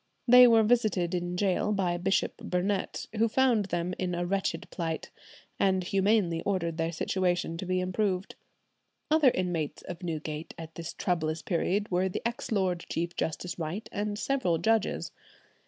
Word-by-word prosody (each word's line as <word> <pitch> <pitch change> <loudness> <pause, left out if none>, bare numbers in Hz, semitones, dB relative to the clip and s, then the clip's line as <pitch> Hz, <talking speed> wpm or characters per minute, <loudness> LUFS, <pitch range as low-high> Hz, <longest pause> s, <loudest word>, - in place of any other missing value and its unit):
They 250 +1 +9
were 225 -2 +6
visited 210 -6 +2
in 175 0 -2
gaol 195 +2 +1
by 185 -3 0
Bishop 190 +2 0
Burnet, 190 +2 -2
who 225 +2 +4
found 235 -3 +3
them 175 -1 -2
in 180 -1 -1
a 175 0 -1
wretched 195 +2 -1
plight, 165 -3 -4 0.5
and 190 -1 +2
humanely 195 -2 +2
ordered 170 -5 -1
their 165 0 0
situation 175 0 0
to 185 - -5
be 185 0 +1
improved. 185 0 -1 0.8
Other 310 -4 +6
inmates 175 - -2
of 175 0 -7
Newgate 155 -2 -5
at 165 -1 -8
this 170 0 -6
troublous 160 -3 -1
period 195 +3 0
were 185 +1 +2
the 230 +6 -2
ex 235 0 -6
Lord 185 -5 0
Chief 170 +1 -2
Justice 175 +3 -3
Wright 170 +7 -4
and 205 0 -2
several 225 -9 +1
judges. 220 +5 0
185 Hz, 155 wpm, -29 LUFS, 170-205 Hz, 0.8 s, They